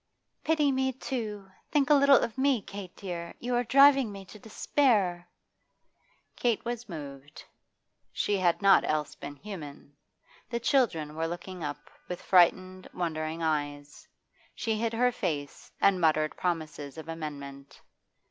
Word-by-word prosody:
'Pity 305 -3 +2
me, 265 0 +1
too! 220 -6 -5 0.2
Think 295 -1 +2
a - - +9
little 280 -1 +7
of 230 - -1
me, 265 -2 +2
Kate 195 -2 -9
dear! 170 -3 -6
You 245 +1 -3
are 245 0 +2
driving 275 -1 +5
me 195 -1 -9
to 215 - -12
despair.' 205 -6 +1 1.1
Kate 235 -3 0
was 240 -1 -4
moved, 145 -3 -9 0.7
she 205 - 0
had 180 +2 +1
not 195 -1 +6
else 150 -1 -1
been 145 - -9
human. 150 -6 -9 0.5
The 235 -1 -2
children 220 - +1
were 165 +1 -1
looking 175 +1 -7
up 145 -1 -5 0.2
with 180 - -5
frightened, 185 +1 +3
wondering 160 -1 -3
eyes. 145 -2 -3 0.5
She 225 -2 -1
hid 225 +1 -1
her 250 +2 +3
face 145 - -4
and 190 -2 +3
muttered 155 -1 +2
promises 155 -4 -3
of 160 - -8
amendment. 140 -4 -7
185 Hz, 140 wpm, -29 LUFS, 155-235 Hz, 1.1 s, a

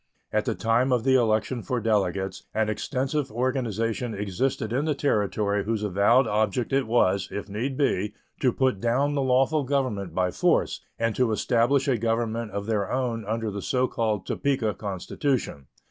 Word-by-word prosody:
At 105 0 +1
the - - -1
time 115 +3 +2
of 125 -3 +2
the 135 0 +3
election 115 0 +2
for 125 0 -2
delegates 95 -4 -1
an 110 -1 +1
extensive 130 +5 -2
organization 115 -2 -1
existed 110 +3 -2
in 135 +4 0
the 155 -2 0
Territory 105 -6 0
whose 110 -1 -2
avowed 105 +6 +4
object 110 +4 0
it 135 -3 +2
was, 100 -5 +2
if 100 - -5
need 120 +7 -3
be, 105 -7 0 0.2
to 130 - +3
put 130 -5 +1
down 130 +5 +1
the 140 - 0
lawful 135 +4 +2
government 125 - -1
by 90 -1 +1
force - - +1
and 115 -1 0
to 125 -3 +2
establish 120 +5 +2
a 125 -4 +2
government 115 0 -1
of 100 0 -4
their 105 -3 -1
own 120 -3 -1
under 110 0 -2
the 100 0 -5
so 130 +3 +1
called 110 -5 -1
Topeka 130 -7 0
constitution. 100 - -3
115 Hz, 170 wpm, -26 LUFS, 105-130 Hz, 0.2 s, avowed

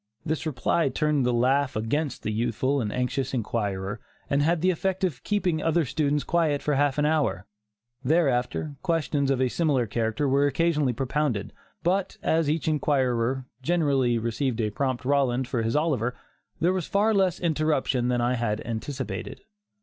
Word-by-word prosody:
This 160 +1 -2
reply 155 +1 +1
turned 150 -3 +1
the - - +2
laugh 130 +3 +2
against 125 +6 -2
the 110 - -1
youthful 120 +5 0
and 105 -3 -2
anxious 125 +2 -1
inquirer 105 -3 -2 0.3
and 140 +1 +3
had 165 +2 +2
the 185 +1 +4
effect 190 +2 -2
of 165 -10 -1
keeping 185 -6 0
other 165 0 +2
students 145 +2 0
quiet 160 -4 +1
for 150 - 0
a - - +1
half 145 -1 +2
hour. 150 -10 +1 0.6
Thereafter, 140 -1 +1
questions 155 -5 0
of 135 -2 +1
a 130 - +3
similar 140 -3 +1
character 115 +5 -1
were 140 +2 +3
occasionally 150 -2 +1
propounded, 135 -3 -1 0.3
but 185 +2 0
as 160 -2 +2
each 160 +1 -1
inquirer 130 -4 +1 0.2
generally 140 -6 +2
received 120 +2 -1
a 105 -2 0
prompt 130 +1 -2
Roland 130 -2 +1
for 120 - -1
his 115 +1 -1
Oliver, 135 -6 0 0.4
there 175 +3 +2
was 185 -4 -2
far 210 +3 +2
less 190 -4 +2
interruption 155 -6 +1
than 125 -1 +1
I 120 +1 +1
had 115 -3 -1
anticipated. 115 -2 -5
140 Hz, 165 wpm, -26 LUFS, 120-155 Hz, 0.6 s, the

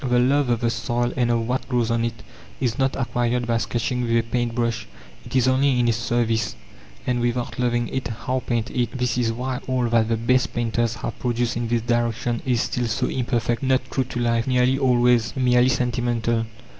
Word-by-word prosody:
The 125 -2 +2
love 135 +2 +3
of 120 -1 +1
the 115 -1 +1
soil 120 +1 -1
and 120 -2 +1
of 115 -1 +1
what 125 +1 -2
grows 120 -3 +1
on 115 0 +1
it 115 -1 -4 0.4
is 120 -3 -1
not 135 0 +1
acquired 120 -1 0
by 115 -1 +1
sketching 120 +3 -1
with 115 -1 +1
a 115 - +2
paint 120 0 -2
brush 115 -2 -1 0.4
it - - -8
is 130 -1 +4
only 130 0 +3
in 120 - +2
its 115 -1 +1
service; 115 -1 0 0.5
and 125 -1 0
without 120 +1 -2
loving 120 -1 +1
it, 130 - -3
how 125 +3 -2
paint 120 -1 -1
it? 125 +1 -1
This 125 -1 0
is 120 -2 +1
why 125 +2 -3
all 130 -2 +1
that 115 -1 +2
the 115 - +1
best 125 +3 +1
painters 120 0 0
have 115 - -6
produced 120 -1 -1
in 120 0 -2
this 115 -1 0
direction 120 0 0
is 125 -3 +2
still 125 -1 -1
so 110 - 0
imperfect, 120 -2 -1
not 130 -1 +2
true 130 - 0
to 120 - -5
life, 115 0 +1
nearly 130 +1 +2
always 120 -3 +3
merely 125 -1 +4
sentimental. 120 -2 0
120 Hz, 205 wpm, -23 LUFS, 115-125 Hz, 0.5 s, is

